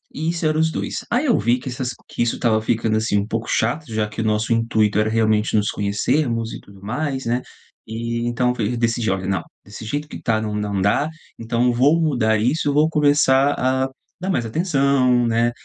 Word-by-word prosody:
E 160 +2 -1
isso 170 -1 -2
era 155 0 +2
os 160 0 +2
2. - - -4
Aí 250 +5 +2
eu 245 - +3
vi 120 +2 +2
que 130 - -11
essa 125 +1 -5
s 125 -2 -3
que - - -5
isso 120 - +1
estava 110 -2 +1
ficando, 110 -1 0
assim, 110 -1 +1
um 100 +1 -1
pouco 115 0 -3
chato, 135 +8 0
já 110 -1 0
que 105 +2 -5
o - - -1
nosso 110 +1 +1
intuito 110 -2 +1
era 110 +1 +2
realmente 110 -1 +1
nos 105 0 +1
conhecermos 115 +3 -1
e - - -8
tudo 100 -1 -17
mais, 135 +5 -3
né. 120 +2 0 0.4
E 115 +1 -3
então 125 +1 +1
f 115 +1 -1
decidi 115 -2 0
olha, 95 0 -2
não 95 -1 -1 0.2
desse 105 +2 -10
jeito 145 +7 -3
que - - -9
tá, 110 -2 +1
não 105 -1 -3
não 100 -2 -2
dá. 100 +10 +2 0.3
Então 120 +2 0
vou 145 +7 +3
mudar 120 -9 +2
isso. 145 +6 +1
Vou 150 +2 +4
começar 145 -2 +3
a 130 +1 +1 0.3
dar 190 - -3
mais 120 -11 0
atenção, 135 - +2
né. 115 +1 +2
120 Hz, 215 wpm, -21 LUFS, 110-140 Hz, 0.4 s, Vou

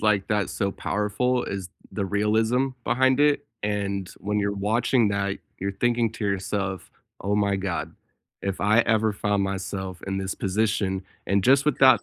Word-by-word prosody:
like 105 -2 +2
that 105 -2 +1
so 100 -2 -1
powerful 105 +6 0
is 95 -2 -4 0.2
the 100 - -2
realism 110 +6 +2 0.2
behind 130 +1 +3
it, 145 -1 +3 0.2
and 100 -2 -1
when 105 +1 -1
you're 100 0 0
watching 110 +3 +2
that, 100 -1 -1 0.2
you're 100 +1 -2
thinking 120 +2 +1
to 110 - -5
yourself, 95 -1 -2 0.3
"Oh 100 +1 0
my 100 -1 +2
god, 85 -5 -3 0.5
if 100 -1 -3
I 110 +3 +5
ever 110 -2 +2
found 100 -1 0
myself 95 -1 -4
in 95 - -2
this 95 -1 -3
position" 100 -1 0 0.2
and 100 -1 +2
just 135 +1 +5
with 150 -3 +1
that 130 -5 +7
100 Hz, 165 wpm, -25 LUFS, 100-110 Hz, 0.5 s, that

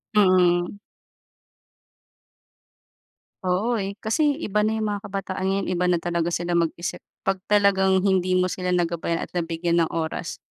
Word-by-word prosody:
Mm. 185 -2 +3 2.7
Oo, 210 +6 +1
eh. 195 0 -4
Kasi 290 +6 +2
iba 210 -9 -1
na 220 - 0
yung 215 -1 -1
mga 205 +1 -5
kabataan 190 -1 -3
ngayon 195 +1 0
iba 180 0 +1
na 180 - +3
talaga 170 0 -1
sila 175 0 -2
mag-isip, 170 +1 -2 0.2
'pag 195 0 0
talagang 190 -2 +3
hindi 185 -2 +2
mo 185 0 +2
sila 180 -1 -1
nagabayan 170 -1 -1
at - - -9
nabigyan 170 0 0
ng 165 - +3
oras. 160 -1 -4
185 Hz, 140 wpm, -24 LUFS, 175-200 Hz, 2.7 s, Mm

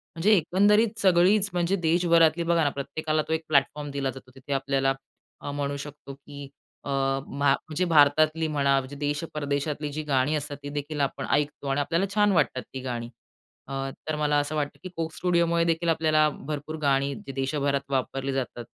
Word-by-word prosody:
म्हणजे 200 +6 +3
एकंदरीत 205 +6 +3
सगळीच 190 +2 +4
म्हणजे 175 +2 +1
देशभरातली, 170 -1 +3
बघा 170 -1 +2
ना 145 - +3
प्रत्येकाला 155 +3 -2
तो 160 - -1
एक 160 0 -1
प्लॅटफॉर्म 145 0 +1
दिला 140 -1 -2
जातो, 130 -1 -13
तिथे 135 +1 -5
आपल्याला 135 0 +1 0.5
अ, 145 - -5
म्हणू 140 0 -2
शकतो 140 -1 -9
की 140 0 -11 0.4
अ, - - -5
मा 135 +1 0
म्हणजे 160 +5 -2
भारतातली 155 0 +4
म्हणा, 140 -2 +2
म्हणजे 135 +1 -8
देश 145 +2 -2
परदेशातली 145 0 -2
जी 155 0 -3
गाणी 140 +1 +1
असतात 145 -1 -4
ती 145 - -5
देखील 145 +1 -4
आपण 135 -1 -1
ऐकतो 145 0 0
आणि 135 +1 +1
आपल्याला 170 +6 0
छान 205 -1 +4
वाटतात 130 -6 +1
ती 130 - -5
गाणी. 120 -2 -4 0.6
अ, 135 - -7 0.3
तर 155 - -1
मला 150 -1 +2
असं 145 +2 -2
वाटतं 145 -1 -2
की 185 - -6
Coke 160 -1 -3
Studiosमुळे 170 -1 +2
देखील 165 0 0
आपल्याला 155 -1 +3 0.2
भरपूर 150 +1 -4
गाणी 140 0 +2 0.2
देशभरात 140 0 -1
वापरली 135 0 -1
जातात. 125 -3 -4
145 Hz, 175 wpm, -26 LUFS, 140-165 Hz, 0.6 s, सगळीच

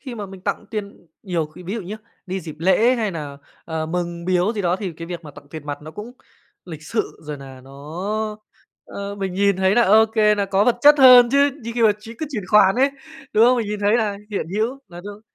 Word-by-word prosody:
khi 260 -4 -8
mà 210 -3 -6
mình 190 -1 -12
tặng 200 +2 -3
tiền 205 -5 -7 0.2
nhiều 175 -6 -2
khi 155 +4 -14
ví 185 +4 -5
dụ 230 - -3
nhá, 195 +4 -7 0.3
đi 190 +1 -3
dịp 155 -3 -8
lễ 215 +9 +3
hay 220 -4 -1
nà, 145 -5 -7 0.3
ờ, 160 -1 -4
mừng 170 0 -4
biếu 185 +3 +1
gì 210 -3 -3
đó, 175 0 +1
thì 190 -3 -5
cái 165 +1 -9
việc 170 -1 -7
mà 150 - -9
tặng 145 - -15
tiền 155 -2 -9
mặt 145 0 -5
nó 155 - -9
cũng 210 +8 -9 0.5
lịch 160 -4 -9
sự, 220 +7 -3
rồi 150 -1 -6
nà 135 -2 -12
nó, 135 - -15 1.1
ơ, 200 0 -7
mình 195 -2 -4
nhìn 200 0 +2
thấy 190 +1 +2
là 240 - +5
ô 220 +1 +5
kê, 215 -1 +3
nà 205 -1 -1
có 195 +1 +1
vật 245 - +2
chất 295 +3 +8
hơn 250 -2 +9
chứ, 280 +1 +4
như 230 - -5
khi 240 - 0
mà 220 -2 +6
ch 210 +2 -15
cứ 315 - -3
chuyển 210 -7 -4
khoản 195 -1 +5
ấy, 270 +2 +3 0.4
đúng 220 +1 +5
không? 250 +1 +5
Mình 230 -3 -1
nhìn 210 0 -4
thấy 205 +2 +3
là 215 -4 -1
hiện 200 - -3
hữu 235 +5 -1
là 175 -1 -10
đâu 205 0 -9
200 Hz, 255 wpm, -21 LUFS, 175-220 Hz, 1.1 s, hơn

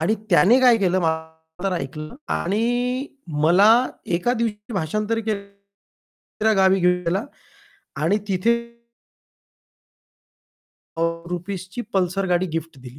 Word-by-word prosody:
आणि 195 +7 +2 0.2
त्याने 200 +8 +5
काय 250 -2 +6
केलं 185 -1 +1
माझं 160 +1 -4
तर 195 - +1
ऐकलं 155 - -5 0.2
आणि 245 +7 0 0.4
मला 180 +6 +6 0.5
एका 240 +8 0
दिवशी 225 -1 -3
भाषांतरी 215 +6 -1
केल 215 -2 -2
दुसऱ्या 200 +2 -6
गावी 190 0 +4
घेऊन 180 0 +2
गेला 190 +6 0 0.8
आणि 185 +7 +2
तिथे 195 +4 +2 2.5
हो, 165 0 -1
रुपीजची 185 +4 -5
पल्सर 190 0 0
गाडी 175 +1 +2
गिफ्ट 165 -3 -6
दिली. 125 +1 -12
190 Hz, 115 wpm, -22 LUFS, 165-215 Hz, 2.5 s, काय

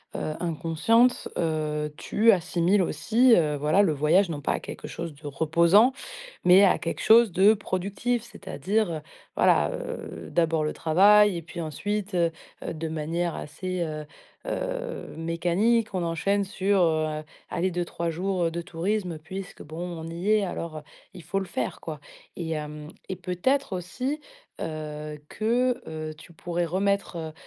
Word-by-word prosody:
heu, 155 - -2
inconsciente, 175 +9 +2
heu, 150 -2 -1
tu 225 +2 +4
assimiles 180 +2 +2
aussi, 235 +6 +3
heu, 150 -3 +2
voilà 150 +7 +3
le 160 -6 +2
voyage 165 +6 +3
non 145 -3 -4
pas - - 0
à - - -2
quelque - - -8
chose 170 -2 -6
de 150 +1 -17
reposant, 170 - +4 0.5
mais 185 +3 +7
à 195 - +5
quelque 165 - -4
chose 225 -2 +6
de 195 +5 +6
productif. 205 +4 -2
C'est-à-dire, 205 - -2
heu, 155 -2 -4 0.4
voilà, - - +4
heu, - - -6
d'abord 165 -2 +2
le 150 - -1
travail 200 +4 +5
et - - -4
puis 170 +1 -7
ensuite, 205 +6 -3
heu 170 -1 +2 0.3
heu, - - -3
de 160 +1 -4
manière 165 +2 -2
assez, 185 +4 -4
heu 155 -2 -3 0.4
heu, - - -4
mécanique, 180 +7 +1
on 180 -2 -1
enchaîne 195 +5 +1
sur, 195 0 +1
heu, 155 -2 +1 0.3
allez 185 +2 0
2-3 170 -1 -2
jours, 180 +2 -1
heu, 165 - 0
de 170 +1 -3
tourisme. 175 +1 -2
Puisque, 185 +4 -8
bon 155 +3 -9 0.2
on 160 - -6
y 170 +5 -3
est, 215 -2 +4
alors, 165 -3 -5
heu, - - -6 0.3
il 175 - -11
faut 195 +1 -1
le 190 - -4
faire 125 -8 -3
quoi 155 -3 -6 0.4
et 165 -2 -4
hem 150 0 -5 0.2
et 190 - -2
peut-être 200 +7 0
aussi, 255 - -3 0.4
heu, 150 -1 -5
que, 245 +3 +1
heu, 155 0 -5
tu 170 +2 -15
pourrais 175 +1 -2
remettre, 185 -3 -1
175 Hz, 160 wpm, -26 LUFS, 160-205 Hz, 0.5 s, mais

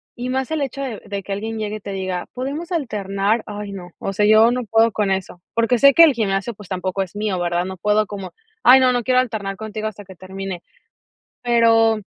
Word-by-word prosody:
y 245 +1 -5
más 265 +2 -2
el 315 -2 -1
hecho 275 0 -3
de 235 -6 -5
de 200 -1 -5
que 200 - -8
alguien 220 +2 -4
llegue 215 0 -3
y - - -12
te 200 0 -7
diga: 185 -2 -3
"Podemos 285 +8 -5
alternar". 210 - -1
Ay, 205 -1 -6
no. 180 -3 -9
O 195 - -4
sea, 210 +2 +2
yo 220 +2 +6
no 250 0 -2
puedo 225 +1 +3
con 205 -1 -1
eso. 190 -2 -3
Porque 230 +1 +2
sé 280 -1 +7
que 335 - +8
el 310 - +6
gimnasio, 210 0 -1
pues, 205 -2 -14
tampoco 185 +1 -2
es 190 0 -5
mío, 205 -3 -2
¿verdad? 175 0 0
No 190 0 -6
puedo 210 +3 +2
como: 195 -3 -7 0.3
"Ay 260 +1 +8
no, 255 -1 +4
no 245 -1 0
quiero 255 +1 +3
alternar 205 -5 -4
contigo 215 0 -5
hasta 205 -1 -8
que 190 0 -13
termine". 190 0 -7 0.8
Pero 225 -2 +3
215 Hz, 230 wpm, -20 LUFS, 195-235 Hz, 0.8 s, que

